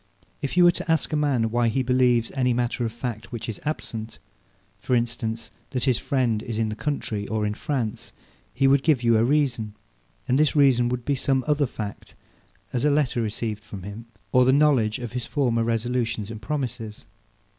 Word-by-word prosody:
If 140 +4 -3
you 180 - +7
were 175 - +8
to 165 - -3
ask 160 0 +1
a - - +3
man, 135 -7 +1
why 120 0 +2
he 130 +4 +1
believes 125 -2 +2
any 125 -2 +1
matter 120 0 -1
of 115 - -1
fact, 120 -1 -5
which 120 -3 -5
is 115 - -5
absent; 115 -7 -4 0.6
for 125 +5 0
instance, 115 -1 -2 0.2
that 130 -2 -2
his 130 -3 +2
friend 120 -6 0
is 115 -1 -5
in 110 -1 0
the 110 - -4
country, 110 -5 -3
or 110 -1 -1
in 105 - -1
France; 120 -2 -3 0.4
he 135 +1 +2
would 135 0 +5
give 145 -4 +2
you 115 -1 +4
a - - +3
reason; 120 -6 +1 0.5
and 130 +1 +2
this 155 0 +3
reason 130 -4 +4
would 125 -1 -3
be 145 - +1
some 135 -1 +1
other 150 -2 +2
fact; 105 -4 -7 0.6
as 125 0 0
a 150 - +4
letter 140 -5 +1
received 110 -1 -3
from 100 -3 -9
him, 105 +4 -8 0.2
or 125 - +5
the 130 - +4
knowledge 135 -7 +3
of 120 -2 -6
his 125 -1 -4
former 120 -5 +1
resolutions 115 -2 -1
and 110 -1 -8
promises. 120 -4 -4
120 Hz, 200 wpm, -25 LUFS, 115-135 Hz, 0.6 s, were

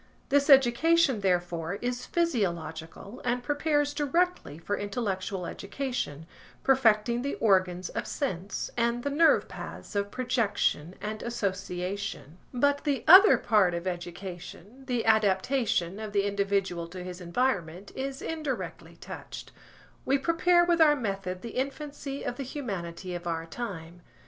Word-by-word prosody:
This 285 +1 +3
education, 270 0 +5
therefore, 175 -2 0
is 245 +3 -4
physiological 195 - -2
and 245 0 -1
prepares 290 +1 +1
directly 325 - 0
for 185 +5 -2
intellectual 195 -3 -3
education, 200 - -4 0.4
perfecting 235 -3 +3
the 280 +2 -2
organs 185 -4 +2
of - - -4
sense, 195 -8 -3
and 235 0 0
the 285 - -1
nerve 320 +3 +4
paths - - -9
of 200 0 0
projection 210 - 0
and 215 +1 -4
association. 190 - -4
But 285 +3 +1
the 285 -3 0
other 385 +5 +9
part 195 -5 +3
of 170 +1 -4
education, 180 +6 -7
the 245 -3 -1
adaptation 210 -2 +2
of 215 -2 -6
the 200 -1 +2
individual 200 -4 -1
to 180 +1 -8
his 180 0 -7
environment, 180 -2 -1
is 270 0 -4
indirectly 305 -5 -4
touched. - - -9 0.5
We 275 - +2
prepare 345 +4 +3
with 345 -1 +2
our 300 -2 +7
method 195 -7 -4
the 235 - -5
infancy 275 +1 -4
of 245 - -3
the 275 - -3
humanity 190 - -5
of 175 0 -5
our 165 -1 -2
time. 175 -4 -7
215 Hz, 135 wpm, -28 LUFS, 180-270 Hz, 0.5 s, other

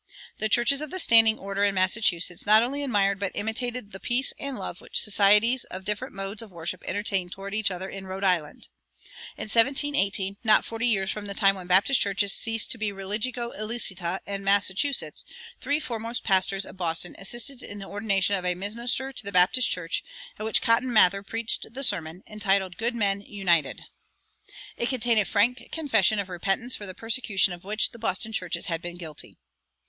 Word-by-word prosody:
The 215 - -1
churches 240 +6 +3
of 305 - -5
"the 370 - -4
standing 225 -9 +7
order" 200 +1 -3
in 200 -1 +2
Massachusetts 185 -2 +1
not 215 +2 +7
only 280 +4 -2
admired 200 -6 +1
but 200 -2 -3
imitated 225 0 -3
"the 190 - -9
peace 245 +6 0
and 280 -2 -4
love 175 - -7
which - - -1
societies 210 +4 +4
of 185 +1 -9
different 210 +4 -3
modes 195 +2 -3
of 225 - -10
worship 170 0 -6
entertained 195 -2 -2
toward 195 +2 -7
each 215 -1 +1
other 185 0 -5
in 195 0 -8
Rhode 190 +1 -6
Island." 175 -6 0 0.7
In - - -5
1718, 215 -5 +1
not 215 -2 +4
forty 230 +2 -2
years 195 -4 +1
from 210 -1 -6
the 200 - -5
time 195 -1 +4
when 185 -2 -9
Baptist 195 +9 +4
churches 200 0 +1
ceased 225 -1 +1
to 230 - -2
be 215 -1 -1
religio 215 +5 -4
illicita 195 -5 -3
in 200 0 -5
Massachusetts, 200 +7 +1 0.4
three 290 +1 0
foremost 230 -4 -5
pastors 190 0 +1
of - - -12
Boston 170 -1 -2
assisted 240 +6 -2
in 205 - -9
the 195 - -7
ordination 200 -1 0
of 185 - -4
a 180 0 +1
minister 235 +7 -2
to - - -4
the 200 - -6
Baptist 190 +7 +4
church, 180 -1 -1 0.4
at - - -5
which 220 - +4
Cotton 245 +2 +2
Mather 195 -3 +5
preached 225 +2 -3
the 275 - -3
sermon, 165 -6 -1
entitled 195 -3 -1
"Good 235 +2 0
Men 200 -3 0
United." 180 -7 0 0.9
It 235 - -2
contained 240 -3 +1
a 205 - +1
frank 235 +6 +1
confession 225 - +2
of 200 -2 -2
repentance 195 +7 -1
for 205 - -7
the 185 - -6
persecutions 220 -4 0
of 175 - -11
which 210 +3 0
the 235 - -13
Boston 220 0 -1
churches 180 -5 -2
had 165 -2 -3
been 175 0 -7
guilty. 160 -4 -8
205 Hz, 190 wpm, -26 LUFS, 190-230 Hz, 0.9 s, standing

